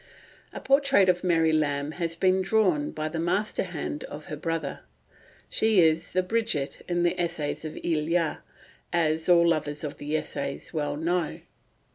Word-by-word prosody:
A - - -7
portrait 275 -8 +4
of 180 0 +2
Mary 165 -3 +3
Lamb 145 -1 0
has 165 0 -3
been 185 +2 +2
drawn 185 -7 +2
by 155 0 -4
the 160 +1 -4
master 185 +6 0
hand 160 -4 -4
of 150 +1 -9
her 155 - -5
brother. 160 -1 -3 0.7
She 220 -3 +3
is 165 -1 +3
the 185 - +2
Bridget 185 -9 -1
of 175 0 +1
the 175 +1 +1
Essays 165 -4 -2
of 155 - -6
Elia, 165 0 0 0.5
as 160 -1 +1
all 170 -1 +6
lovers 150 -2 -1
of 145 -2 -5
the 150 +2 -1
essays 140 0 -4
well 145 -2 -2
know. 170 +1 -1
165 Hz, 160 wpm, -27 LUFS, 150-180 Hz, 0.7 s, all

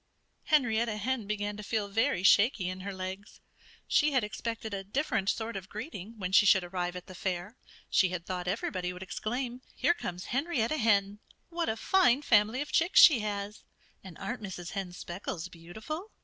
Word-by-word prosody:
Henrietta 235 -7 +2
Hen 230 0 -2
began 205 0 -2
to - - -6
feel 210 0 -1
very 220 -1 +1
shaky 200 -1 +5
in 185 +1 -4
her 200 +2 -5
legs. 190 +2 -7 0.5
She 300 -1 +3
had 255 -4 +3
expected 220 +1 -4
a 195 -1 -3
different 200 -2 -1
sort 225 0 -2
of 190 -1 -6
greeting, 215 - -7
when 185 -3 -3
she 205 +1 +6
should 190 -2 +6
arrive 175 0 -3
at 180 - -7
the 185 - -11
fair. 185 +3 -3 0.3
She 190 - +3
had 175 -2 -5
thought 180 -1 -4
everybody 180 -2 -2
would 180 +1 -8
exclaim, 245 +6 -4
"Here 345 - +3
comes 180 - -6
Henrietta 275 -1 0
Hen! 205 -4 +2 0.3
What 335 -1 -2
a 220 - -1
fine 295 -4 +3
family 225 +1 +3
of 295 +1 -5
chicks 345 +4 +4
she 295 -8 +9
has! 205 0 -4 0.4
And 185 -3 -11
aren't 250 -1 -5
Mrs. 185 -4 -6
Hen's 185 -3 -5
speckles 175 -1 -5
beautiful?" 220 - -7
210 Hz, 180 wpm, -30 LUFS, 185-240 Hz, 0.5 s, she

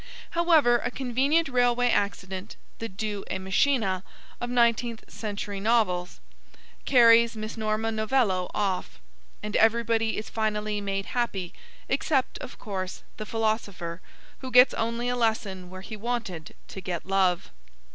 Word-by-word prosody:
However, 320 -8 +4
a 245 - -2
convenient 270 +6 +1
railway 245 -1 +2
accident, 195 0 -2 0.2
the 230 - -4
deus 205 +1 -4
ex 190 - -2
machina 195 0 +1 0.4
of 240 - -3
nineteenth 235 -1 +2
century 205 -2 -4
novels, 195 -5 +1 0.7
carries 235 -2 +6
Miss 215 +1 -5
Norma 220 0 -1
Novello 215 -4 +1
off; 190 - -2 0.4
and 210 0 -4
everybody 225 0 +2
is 215 - -4
finally 210 -1 -1
made 195 -1 -2
happy, 200 -8 -2 0.3
except, 270 -5 0
of - - -9
course, 190 -4 -5
the 215 - -6
philosopher, 205 -6 -2 0.4
who 260 - -6
gets 250 +1 +7
only 230 +2 -1
a 245 - 0
lesson 220 -6 -1
where 185 0 -9
he 215 +3 -7
wanted 215 -7 -4
to 190 - -7
get 175 -3 -4
love. 190 -2 +1
220 Hz, 135 wpm, -27 LUFS, 195-240 Hz, 0.7 s, gets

